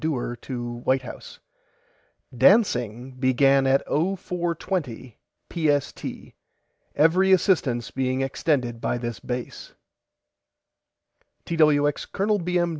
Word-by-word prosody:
DEWAR 135 -6 -2
TO 120 -2 -6
WHITE 130 0 +1
HOUSE: 125 - -10 1.0
DANCING 125 - +3
BEGAN 135 +1 +3
AT 135 +1 +3
OH 175 +6 0
FOUR 175 -2 -3
TWENTY 130 - -5 0.3
PST 150 -4 0 0.9
EVERY 180 +5 +4
ASSISTANCE 155 - +2
BEING 130 0 -1
EXTENDED 130 -4 -1
BY - - -1
THIS 120 -2 -5
BASE 125 -1 -6 1.7
TWX 150 -3 +2
COL. 205 +1 0
B. 180 0 -1
M. 175 0 +1
140 Hz, 105 wpm, -24 LUFS, 125-170 Hz, 1.7 s, EVERY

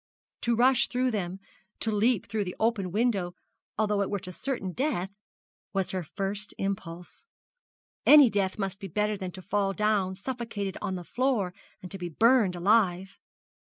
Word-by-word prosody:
To 235 0 +1
rush 250 +2 +4
through 255 0 0
them, 190 -3 -3 0.4
to 225 - 0
leap 215 +1 +2
through 215 0 -1
the 180 - -5
open 215 -5 +1
window 200 -4 0 0.4
although 210 -2 +1
it 200 - -1
were 205 - -1
to 185 -1 -6
certain 200 -2 -3
death, 205 - -1 0.6
was 195 -2 0
her 185 - -2
first 200 +5 -3
impulse. 185 - -5 0.8
Any 295 -3 +9
death 200 -3 0
must 195 -2 -3
be 195 - -6
better 210 +4 0
than 190 -2 -5
to 185 - -9
fall 195 +1 0
down 205 -3 +1
suffocated 210 -3 -4
on 190 - -2
the 180 - -5
floor, 230 -4 0 0.3
and 180 - -8
to 195 - -5
be 175 -1 -4
burned 225 - +4
alive. 190 0 +2
200 Hz, 165 wpm, -28 LUFS, 185-225 Hz, 0.8 s, Any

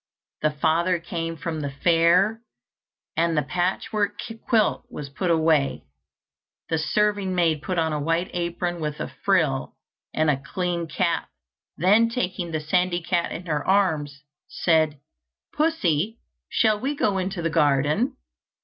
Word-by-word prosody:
The 155 - +3
father 160 +4 +1
came 165 0 -4
from 160 +1 -4
the 145 -1 -3
fair, 175 +9 +3 0.7
and 165 0 +1
the 150 - +3
patchwork 200 +3 -1 0.3
quilt 220 -3 +2
was 145 -2 -7
put 175 +6 -2
away. 160 -4 +2 0.9
The 160 - +1
serving 205 +2 +1
maid 165 -4 +2
put 180 +2 -3
on 160 -1 +1
a 150 - -1
white 165 +4 0
apron 175 0 -2
with 150 -1 -3
a - - -5
frill, 65 0 +1 0.4
and 155 -1 +2
a 135 -2 -2
clean 175 +2 -2
cap, 170 +2 -1 0.5
then 210 +7 +4
taking 185 -7 -2
the 160 -1 -2
sandy 175 +3 0
cat 175 0 0
in 180 - -6
her 150 -4 -1
arms, 155 -8 +1 0.2
said, 155 -3 +1 0.5
"Pussy, 225 - +1 0.3
shall 215 -2 +2
we 275 +6 -2
go 205 -8 +1
into 185 -1 -3
the 165 - 0
garden?" 150 - +2
170 Hz, 140 wpm, -24 LUFS, 155-190 Hz, 0.9 s, then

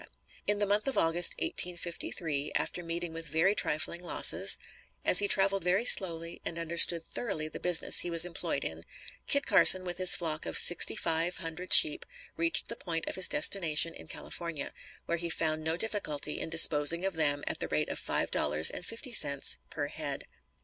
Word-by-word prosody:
In 205 - 0
the 205 - -2
month 205 +4 -3
of 270 - -3
August, 165 +2 +3
1853, 170 -4 -5
after 175 - -4
meeting 170 0 -8
with 165 0 -8
very 160 +6 -1
trifling 170 -2 -3
losses, 175 - +2 0.5
as - - +9
he 205 - +1
traveled 195 -1 0
very 185 +6 -2
slowly 170 -6 +3
and 165 - -7
understood 170 0 +2
thoroughly 165 -6 -7
the 155 - -11
business 175 -2 +4
he 175 - -2
was 170 0 +4
employed 180 - -5
in, - - -7 0.5
Kit 280 -1 +1
Carson 185 0 +6
with 175 0 -8
his 185 -1 +6
flock 155 -3 -6
of - - -2
sixty 175 - +5
five 170 -2 -3
hundred 165 +1 -9
sheep 320 +1 +7 0.3
reached 335 -1 -3
the 230 - -6
point 165 -6 -7
of - - -6
his 190 - +1
destination 170 - +2
in - - -15
California, 170 -5 -8 0.3
where 170 0 -4
he 170 0 -5
found 155 -1 -4
no 160 +1 -4
difficulty 165 -9 -4
in - - -7
disposing 165 +1 +4
of 195 - -4
them 145 -3 -2
at - - -6
the - - -6
rate - - -4
of - - -8
five - - -5
dollars 75 +2 0
and - - -9
fifty 230 +6 -9
cents 140 -9 -1
per - - -7
head. - - -7
170 Hz, 185 wpm, -27 LUFS, 160-190 Hz, 0.5 s, as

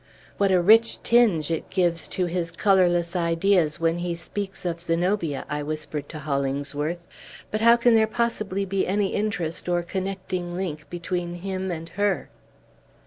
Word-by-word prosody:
"What 200 -1 +3
a 185 - +5
rich 225 +6 +5
tinge 210 -11 +3
it 165 - -3
gives 175 -3 +1
to 185 - -1
his 175 -1 -2
colorless 175 -1 +2
ideas, 170 -1 +2
when 165 +1 +1
he 175 -1 -2
speaks 190 +3 -6
of 170 -1 -2
Zenobia!" 170 -2 -1
I 150 -1 -3
whispered 150 -1 -5
to - - -7
Hollingsworth. 145 +3 -2 0.5
"But 215 - -1
how 235 +1 +7
can 240 0 +4
there 220 -1 +4
possibly 215 -4 -1
be 195 0 -1
any 200 +1 +1
interest 180 -6 -2
or 175 -1 +1
connecting 185 -1 -4
link 155 -5 -4
between 175 0 -3
him 190 +1 -4
and 165 -2 -4
her?" 200 -1 -1
175 Hz, 155 wpm, -25 LUFS, 165-195 Hz, 0.5 s, how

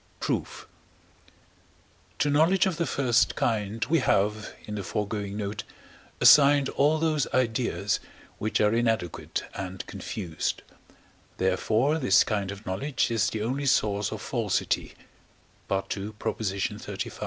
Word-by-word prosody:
Proof. - - -3 1.5
To 145 - +1
knowledge 165 +7 +4
of 185 -4 -1
the 170 - 0
first 125 -3 +2
kind 110 -1 -1
we 165 +2 +2
have 105 +2 +1
(in 105 - -6
the 105 - -3
foregoing 105 0 -3
note) 105 +1 -4 0.6
assigned 140 -1 +7
all 150 +3 +2
those 155 -2 +1
ideas, 115 -4 0 0.4
which 110 - 0
are 105 0 +3
inadequate 115 -7 -1
and 95 -1 -6
confused; 85 -6 -4 0.7
therefore 110 +11 +1
this 130 - +5
kind 100 -3 -2
of 100 +2 -8
knowledge 120 +8 -1
is 115 -3 +2
the 110 -1 -3
only 135 +5 -2
source 105 -4 +2
of - - -6
falsity - - -1 0.7
(II. 100 +2 -2
xxxv.). 100 -3 -3
110 Hz, 120 wpm, -27 LUFS, 100-140 Hz, 1.5 s, assigned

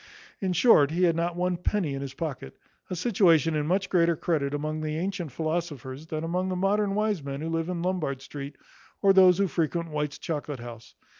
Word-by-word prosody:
In 190 -2 -1
short, 160 - +5
he 170 +4 0
had 170 -2 +4
not 170 +1 -1
one 180 0 0
penny 180 -4 -1
in 135 - -4
his 135 -1 -6
pocket; 140 - -5 0.3
a 180 - -3
situation 170 -5 +3
in 150 -1 -1
much 190 +3 +1
greater 170 -2 +3
credit 150 -4 -1
among 155 +2 -3
the 155 0 -2
antient 180 -3 -3
philosophers 155 -3 -4
than 155 0 -4
among 180 +3 -1
the 185 - -1
modern 195 +2 +1
wise 210 -4 0
men 140 0 -5
who 160 +2 -4
live 165 +1 -1
in 175 -2 -3
Lombard 175 -7 -1
street, 140 0 -7 0.5
or 195 -1 +6
those 185 -2 +7
who 200 0 +2
frequent 170 -1 -1
White's 150 -1 -2
chocolate 145 -4 -4
house. 115 - -10
165 Hz, 205 wpm, -27 LUFS, 150-180 Hz, 0.5 s, those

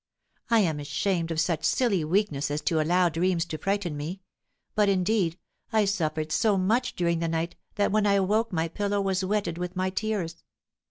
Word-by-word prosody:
I 230 -2 +5
am 160 -6 0
ashamed 165 +4 -1
of 165 -1 -1
such 165 -1 0
silly 210 -10 +2
weakness 155 -4 0
as 150 +1 -2
to 160 -2 +1
allow 175 +3 +3
dreams 170 +1 0
to 155 -2 -6
frighten 195 -5 -1
me, 155 +6 -5 0.5
but, 210 -1 +3
indeed, 185 -2 +1 0.3
I 220 -2 +3
suffered 155 -5 -1
so 210 +2 +2
much 215 +7 +1
during 170 -1 +1
the 165 - -1
night 165 +1 -2 0.2
that 205 -1 +1
when 210 0 +2
I 200 - +4
awoke 210 +4 +2
my 165 -2 0
pillow 205 +4 -1
was 195 -1 0
wetted 190 -4 -1
with 180 +1 -4
my 185 0 0
tears." 185 -5 -3
185 Hz, 185 wpm, -27 LUFS, 165-205 Hz, 0.5 s, I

